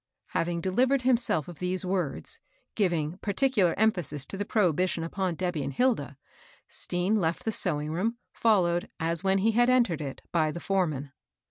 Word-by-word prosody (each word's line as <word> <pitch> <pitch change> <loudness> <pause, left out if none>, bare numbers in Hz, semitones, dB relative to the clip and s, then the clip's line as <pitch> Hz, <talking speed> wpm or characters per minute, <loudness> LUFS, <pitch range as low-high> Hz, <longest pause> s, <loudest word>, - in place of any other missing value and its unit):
Having 170 0 -1
delivered 250 +9 +2
himself 240 - +2
of 175 -3 -10
these 180 0 -2
words, 180 - -2 0.3
giving 175 -4 0
particular 205 -4 +2
emphasis 170 -10 +1
to - - -7
the 205 +1 -3
prohibition 180 -4 +1
upon 180 +1 -2
Debby 175 -3 -2
and 135 0 -3
Hilda, 225 - 0 0.5
Stean 180 +5 -1
left 165 -4 -1
the 225 - +1
sewing 155 -7 +1
room, 215 +8 -1 0.2
followed, 175 -6 +2
as 165 +1 -1
when 195 0 +3
he 215 +4 +2
had 240 +2 +3
entered 235 -11 +3
it, 140 -2 -6
by 160 -2 +2
the 170 - -6
foreman. 155 -8 -1
180 Hz, 160 wpm, -28 LUFS, 165-210 Hz, 0.5 s, when